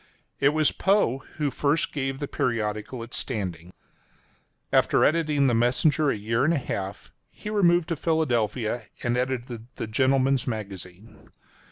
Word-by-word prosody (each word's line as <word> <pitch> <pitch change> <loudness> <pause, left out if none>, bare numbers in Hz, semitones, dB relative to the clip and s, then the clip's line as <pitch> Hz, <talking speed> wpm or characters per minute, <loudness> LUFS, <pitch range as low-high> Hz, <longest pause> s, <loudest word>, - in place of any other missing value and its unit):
It 140 - +5
was 155 0 +2
Poe 190 - +2 0.2
who 150 -2 -1
first 145 +4 0
gave 135 -2 -2
the 145 - -4
periodical 115 0 -2
its 115 - -5
standing. 90 -9 -3
[column - - -39
2:] - - +4
After - - +3
editing 150 -3 +2
the 125 - +3
Messenger 130 +6 +2
a - - +1
year 115 +4 0
and 165 +4 +3
a - - +1
half, 100 -7 -5 0.2
he 210 - -8
removed 175 -5 +3
to 165 - 0
Philadelphia, 120 -8 0 0.2
and 120 0 +1
edited 125 -2 -3
the - - -4
Gentleman's 130 +3 +2
Magazine. 100 -2 -7
130 Hz, 155 wpm, -26 LUFS, 110-150 Hz, 0.2 s, It